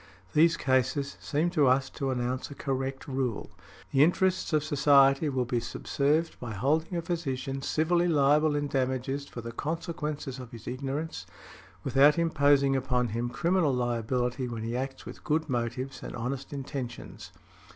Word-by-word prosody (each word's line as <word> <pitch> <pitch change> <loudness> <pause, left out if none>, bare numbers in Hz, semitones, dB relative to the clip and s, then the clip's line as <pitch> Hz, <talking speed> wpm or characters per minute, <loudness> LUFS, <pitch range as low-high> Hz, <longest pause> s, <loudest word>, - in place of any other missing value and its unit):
These 165 +2 +5
cases 135 +2 +1
seem 160 +4 0
to 150 -6 +3
us 130 +1 +3
to 135 -3 -3
announce 125 0 -2
a 145 - -9
correct 135 -1 -3
rule. 130 -5 -2 0.4
The 135 - +5
interests 185 +3 +2
of 155 -2 +2
society 140 -1 +4
will 130 -2 0
be 120 0 0
subserved 145 +6 -1
by 120 -3 -5
holding 155 - 0
a 170 - -2
physician 135 -6 -3
civilly 170 +5 +1
liable 150 -1 +3
in 145 0 0
damages 135 +1 -1
for 120 - -7
the 115 +1 -6
consequences 150 -1 -4
of 125 -2 -8
his 115 - -10
ignorance, 135 -2 -4 0.6
without 135 +4 +5
imposing 145 -4 +3
upon 125 -2 0
him 120 +3 -2
criminal 165 +2 +1
liability 125 +1 -1
when 115 -2 -5
he 115 +1 -3
acts 135 +1 -4
with - - -10
good 155 +1 0
motives 125 +1 -3
and - - -7
honest 125 +3 -4
intentions". 135 -3 -6
135 Hz, 155 wpm, -28 LUFS, 125-150 Hz, 0.6 s, These